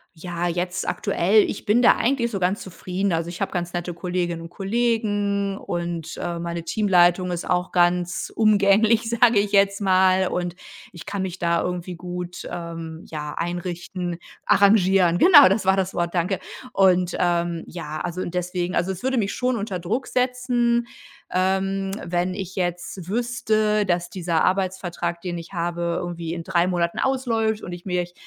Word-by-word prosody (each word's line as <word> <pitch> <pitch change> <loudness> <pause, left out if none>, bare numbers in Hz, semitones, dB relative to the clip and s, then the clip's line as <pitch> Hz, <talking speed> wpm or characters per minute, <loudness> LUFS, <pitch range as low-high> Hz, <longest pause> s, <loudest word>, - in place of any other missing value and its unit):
ja, 175 +1 -3
jetzt 180 +1 -2
aktuell, 205 +5 +3
ich - - -6
bin 225 +3 +3
da 240 - +6
eigentlich 240 -1 +1
so 200 - -3
ganz 185 +3 0
zufrieden. 185 +1 -3
Also, 165 +1 -1
ich 175 - -8
habe 195 - -1
ganz 175 -1 -3
nette 175 0 -3
Kolleginnen 175 -2 -2
und 165 - -9
Kollegen 205 -1 0
und, 170 -3 -4
äh, 170 -1 -3
meine 170 0 -4
Teamleitung 180 -1 +3
ist 175 - -4
auch 180 0 0
ganz 175 0 +1
umgänglich, 215 +1 +4
sage 235 -2 +4
ich 200 0 -1
jetzt 200 0 +3
mal. 185 -1 +4
Und 175 -1 -3 0.4
ich 170 -3 -11
kann 200 -2 -2
mich 185 -1 -5
da 170 -1 +1
irgendwie 180 0 -4
gut, 180 0 -6
ähm, 165 -1 -6
ja, 150 -1 -5
einrichten. 175 0 -4 0.3
Arrangieren, 190 -4 +4
genau, 300 - +8
das 195 0 0
war 190 0 +4
das 190 -1 -1
Wort, 170 0 -1
danke. 180 +2 0 0.3
Und, 185 -2 +3
ähm, 170 -1 0
ja, 155 -3 -6
also, 180 +1 -3
und 175 0 -5
deswegen 180 0 -2
also, 190 +2 +1
es 185 - -7
würde 260 0 0
mich 205 -2 0
schon 250 -1 0
unter 200 -3 -3
Druck 220 +10 -2
setzen, 250 -2 +1 0.5
ähm, 195 +1 0 0.2
wenn 175 +1 -1
ich 190 -2 -6
jetzt 180 0 -3
wüsste, 215 -3 +1
dass 175 0 0
dieser 170 -3 0
Arbeitsvertrag, 185 -2 -1
den 175 -2 -4
ich 165 - -11
habe, 170 0 -2
irgendwie 170 -1 -4
in 170 - -5
3 175 -1 +1
Monaten 170 -2 -1
ausläuft 230 -5 0
und 175 - -6
ich 175 +1 -8
mich 180 -1 -2
180 Hz, 170 wpm, -23 LUFS, 175-200 Hz, 0.5 s, genau